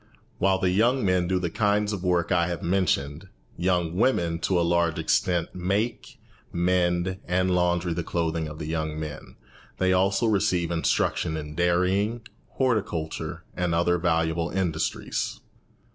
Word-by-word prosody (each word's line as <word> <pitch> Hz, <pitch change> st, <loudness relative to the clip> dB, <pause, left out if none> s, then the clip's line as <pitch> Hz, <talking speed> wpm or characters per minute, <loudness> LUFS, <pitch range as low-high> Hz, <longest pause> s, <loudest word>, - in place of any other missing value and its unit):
While 95 Hz, 0 st, +3 dB
the 95 Hz, -1 st, +1 dB
young 120 Hz, +5 st, +2 dB
men 90 Hz, -2 st, +2 dB
do 95 Hz, +1 st, +1 dB
the 85 Hz, -2 st, -2 dB
kinds 105 Hz, +1 st, +1 dB
of 95 Hz, -3 st, -4 dB
work 90 Hz, -2 st, +1 dB
I 85 Hz, -1 st, +3 dB
have 85 Hz, -2 st, -4 dB
mentioned, 85 Hz, -3 st, 0 dB, 0.3 s
young 90 Hz, -2 st, 0 dB
women 85 Hz, -7 st, +1 dB
to 90 Hz, +1 st, +1 dB
a 85 Hz, -, +2 dB
large 85 Hz, -2 st, +2 dB
extent 90 Hz, -2 st, 0 dB
make, 105 Hz, +8 st, -2 dB, 0.3 s
mend, 90 Hz, +1 st, +1 dB
and 90 Hz, +1 st, +1 dB
laundry 90 Hz, -1 st, +1 dB
the 85 Hz, -, -2 dB
clothing 80 Hz, -2 st, -1 dB
of 75 Hz, 0 st, -8 dB
the 80 Hz, -, -5 dB
young 80 Hz, -1 st, -3 dB
men. 75 Hz, -2 st, -7 dB, 0.4 s
They 95 Hz, 0 st, +2 dB
also 95 Hz, +4 st, +2 dB
receive 90 Hz, -5 st, +1 dB
instruction 80 Hz, -1 st, 0 dB
in 75 Hz, -1 st, -6 dB
dairying, 90 Hz, +7 st, +1 dB, 0.3 s
horticulture, 105 Hz, -11 st, -2 dB
and 90 Hz, -2 st, 0 dB
other 90 Hz, +1 st, +2 dB
valuable 80 Hz, -1 st, 0 dB
industries. 90 Hz, -4 st, -2 dB
90 Hz, 145 wpm, -26 LUFS, 85-95 Hz, 0.4 s, While